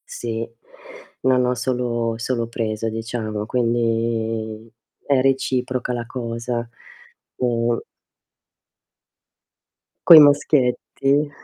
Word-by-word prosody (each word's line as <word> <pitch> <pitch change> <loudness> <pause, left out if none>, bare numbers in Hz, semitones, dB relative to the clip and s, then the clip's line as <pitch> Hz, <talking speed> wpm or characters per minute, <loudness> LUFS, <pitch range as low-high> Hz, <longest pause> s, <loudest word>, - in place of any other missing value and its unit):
Sì, 115 -1 -4 0.7
non 130 -1 +3
ho 125 0 0
solo 120 -2 -1
solo 115 0 -2
preso 115 -1 -3
diciamo, 110 -1 -4
quindi 115 -1 -1 0.3
è 140 -2 +2
reciproca 130 -1 0
la 120 -1 -4
cosa. 120 -1 -4 0.7
Uhm 120 -1 0 2.3
Coi 165 -2 +12
maschietti. 145 0 +2
120 Hz, 80 wpm, -21 LUFS, 115-125 Hz, 2.3 s, Coi